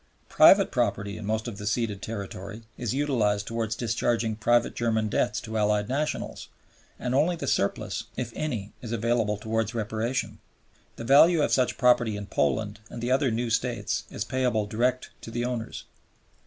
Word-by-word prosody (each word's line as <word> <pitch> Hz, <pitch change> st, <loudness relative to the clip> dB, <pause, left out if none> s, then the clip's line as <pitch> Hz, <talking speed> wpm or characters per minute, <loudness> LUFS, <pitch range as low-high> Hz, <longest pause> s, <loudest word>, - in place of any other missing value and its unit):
Private -, -, +6 dB
property 105 Hz, 0 st, -1 dB
in 110 Hz, -2 st, -7 dB
most 110 Hz, +2 st, -1 dB
of 110 Hz, -3 st, -6 dB
the 105 Hz, -, -5 dB
ceded 105 Hz, -2 st, -1 dB
territory 100 Hz, 0 st, -6 dB
is 120 Hz, -3 st, -3 dB
utilized 115 Hz, -8 st, +1 dB
towards 115 Hz, -1 st, -2 dB
discharging 115 Hz, -1 st, 0 dB
private 120 Hz, +2 st, +2 dB
German 110 Hz, -2 st, 0 dB
debts 105 Hz, -, 0 dB
to 110 Hz, 0 st, -3 dB
Allied 105 Hz, 0 st, +1 dB
nationals, 145 Hz, +4 st, -3 dB, 0.5 s
and 125 Hz, -, -3 dB
only 155 Hz, +6 st, +3 dB
the 170 Hz, -, -5 dB
surplus, 105 Hz, +2 st, -1 dB
if 120 Hz, -2 st, -4 dB
any, 115 Hz, -10 st, -3 dB
is 115 Hz, -, -7 dB
available 115 Hz, -2 st, 0 dB
towards 110 Hz, +1 st, -2 dB
Reparation. 115 Hz, +3 st, -2 dB, 0.6 s
The -, -, -7 dB
value 150 Hz, +6 st, +6 dB
of -, -, +1 dB
such 130 Hz, -1 st, +2 dB
property 120 Hz, -3 st, +3 dB
in 100 Hz, -, -6 dB
Poland 100 Hz, +5 st, -1 dB
and -, -, -7 dB
the 120 Hz, +2 st, -2 dB
other 135 Hz, +1 st, +3 dB
new 115 Hz, +1 st, -1 dB
States 115 Hz, -2 st, -1 dB
is -, -, -4 dB
payable 125 Hz, -5 st, 0 dB
direct 125 Hz, +5 st, -1 dB
to -, -, -8 dB
the 120 Hz, +1 st, -2 dB
owners. 120 Hz, -2 st, -4 dB
115 Hz, 170 wpm, -27 LUFS, 105-125 Hz, 0.6 s, Private